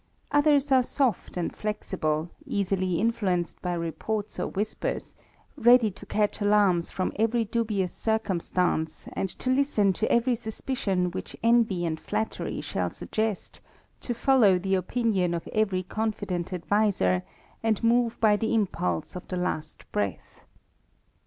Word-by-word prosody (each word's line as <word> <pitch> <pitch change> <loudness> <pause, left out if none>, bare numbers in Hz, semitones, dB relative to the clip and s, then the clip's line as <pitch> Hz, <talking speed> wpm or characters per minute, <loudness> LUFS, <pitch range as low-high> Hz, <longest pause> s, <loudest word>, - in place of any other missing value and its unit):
Others 290 -1 +3
are 260 -1 +6
soft 245 -7 -1
and 175 - -2
flexible, 170 -6 -2 0.2
easily 185 -3 0
influenced 190 -6 0
by 180 -1 -1
reports 170 +6 -3
or - - -1
whispers, 210 +2 -3 0.4
ready 240 -4 +5
to 185 - -13
catch 210 0 0
alarms 205 -4 +3
from 185 - -2
every 225 +1 +2
dubious 210 -5 -1
circumstance, 180 -6 -1
and 195 - -2
to 255 - -1
Lsten 255 -8 +3
to 220 - -1
every 240 +2 +3
suspicion 220 -5 -2
which - - -6
envy 230 -7 +3
and 160 -1 -2
flattery 220 - -3
shall - - -2
suggest, 220 -2 -3 0.4
to 240 - -4
follow 235 -7 +5
the 190 +2 -1
opinion 190 -2 +1
of 170 - -5
every 195 -4 +1
confident 200 -3 -3
adviser, 180 - +1 0.4
and 225 -2 0
move 235 0 +2
by 215 -2 +5
the 220 +2 0
impulse 90 - -1
of 180 - -7
the 185 - -3
last 155 -3 -3
breath. 100 -2 -3
205 Hz, 135 wpm, -27 LUFS, 180-230 Hz, 0.4 s, are